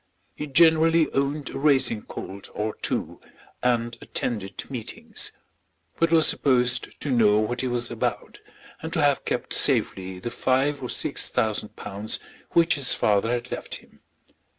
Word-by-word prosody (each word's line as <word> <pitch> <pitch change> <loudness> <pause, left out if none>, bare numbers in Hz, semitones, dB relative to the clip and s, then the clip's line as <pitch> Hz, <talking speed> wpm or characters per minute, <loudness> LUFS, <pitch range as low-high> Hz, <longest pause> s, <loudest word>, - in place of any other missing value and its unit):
He 150 - -6
generally 160 +2 +4
owned 140 +1 -1
a - - -5
racing 135 -6 +2
colt 100 +1 -8
or 105 +1 -2
two, - - -3 0.4
and 120 -1 +1
attended 105 -5 -3
meetings; 125 -5 -4 0.7
but 165 0 +3
was 160 -2 +5
supposed 125 -2 +2
to 145 - -2
know 110 -4 +4
what 115 +3 0
he 130 - -1
was 120 -1 -1
about, 120 - -3 0.4
and - - -5
to - - +1
have - - +2
kept - - -2
safely 95 -1 +2
the 105 +6 -5
five 135 +2 +1
or 125 - -5
six - - 0
thousand 105 -1 -1
pounds 105 +3 -4 0.3
which 170 0 +4
his 140 -3 +2
father 105 +1 +2
had 120 +1 -2
left - - -4
him. - - -14
125 Hz, 150 wpm, -25 LUFS, 110-140 Hz, 0.7 s, was